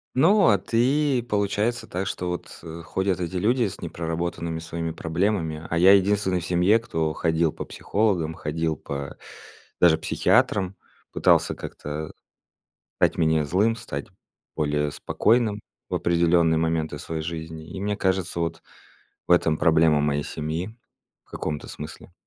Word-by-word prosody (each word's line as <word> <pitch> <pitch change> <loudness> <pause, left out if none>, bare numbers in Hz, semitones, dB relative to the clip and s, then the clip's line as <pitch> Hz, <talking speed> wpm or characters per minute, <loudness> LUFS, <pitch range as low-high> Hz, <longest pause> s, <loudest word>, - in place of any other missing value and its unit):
Ну 190 +9 +5
а 100 - +5
ты, 130 +7 +1
получается 105 +1 -1
так, 95 +2 -3
что 90 -2 -3
вот, 90 - -6
э, 85 0 -8
ходят 95 +3 -1
эти 90 +1 -4
люди 115 +6 +2
с 95 - -8
непроработанными 85 0 -3
своими 80 0 -4
проблемами, 80 -1 -1
а 85 - 0
я 95 +3 +7
единственный 100 -1 +2
в 85 - -6
семье 90 +6 +3
кто 80 -8 -2
ходил 80 -1 +1
по - - -5
психологам, 95 -7 -1
ходил 80 +1 -2
по 70 0 -6 0.6
даже 85 -2 +6
психиатрам. 95 -1 +1 0.4
Пытался - - +3
как-то 75 +1 -6 0.8
стать - - +2
менее 80 -1 +3
злым, 100 +9 +2
стать 90 -11 -6 0.5
более 75 -1 0
спокойным 110 +5 +1 0.3
в - - -1
определенные 85 -1 +3
моменты 80 -2 -1
своей 80 +1 -4
жизни. 80 -1 -6
И - - -7
мне 105 +1 -1
кажется, 95 -2 0
вот 85 -1 -2 0.7
в - - +5
этом 80 -2 +4
проблема 80 -2 +4
моей 75 0 0
семьи 80 +7 -4 0.5
в - - -31
каком-то 75 -1 -4
смысле. 75 +3 -9
85 Hz, 145 wpm, -24 LUFS, 80-100 Hz, 0.8 s, я